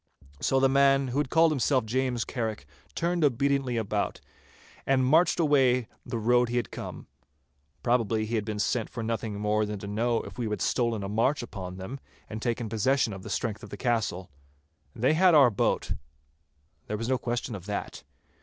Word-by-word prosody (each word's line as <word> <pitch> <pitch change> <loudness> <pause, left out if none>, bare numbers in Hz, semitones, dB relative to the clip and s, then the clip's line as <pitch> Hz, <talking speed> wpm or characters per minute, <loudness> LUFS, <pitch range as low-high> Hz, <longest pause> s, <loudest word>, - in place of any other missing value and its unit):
So 135 - +2
the 135 - +5
man 135 0 +3
who 130 +4 -1
had 145 -3 0
called 165 +1 +4
himself 130 -3 +1
James 125 +1 -1
Carrick 110 - -4 0.3
turned 170 0 0
obediently 135 -2 +1
about, 105 -2 -1 0.7
and 130 -1 +3
marched 160 +8 +4
away 130 -6 +3 0.2
the 120 -1 -4
road 120 +2 +3
he 120 - -1
had 120 - -2
come. - - -7 0.8
Probably 115 -3 +1
he 110 - -6
had 110 -2 +1
been 105 0 -4
sent 110 +2 0
for 115 - -5
nothing 110 -2 -3
more 105 +1 +1
than 105 0 -3
to 100 - -8
know 115 +3 0
if - - -10
we 115 -3 -1
had 105 - -2
stolen 115 -4 0
a - - -3
march 115 +7 +1
upon 95 -5 -7
them, 115 +9 -7 0.3
and 110 0 -6
taken 120 -1 -1
possession 115 +2 +1
of 95 - -8
the - - -9
strength 110 -2 -2
of - - -10
the - - -7
castle. 110 - -1 0.6
They 130 +6 +2
had 175 +1 +5
our 135 -5 +7
boat—there 75 +2 -5
was 115 +2 -3
no 130 -1 +1
question 120 0 -3
of 95 -2 -8
that. 105 - -4
120 Hz, 185 wpm, -28 LUFS, 105-130 Hz, 0.8 s, our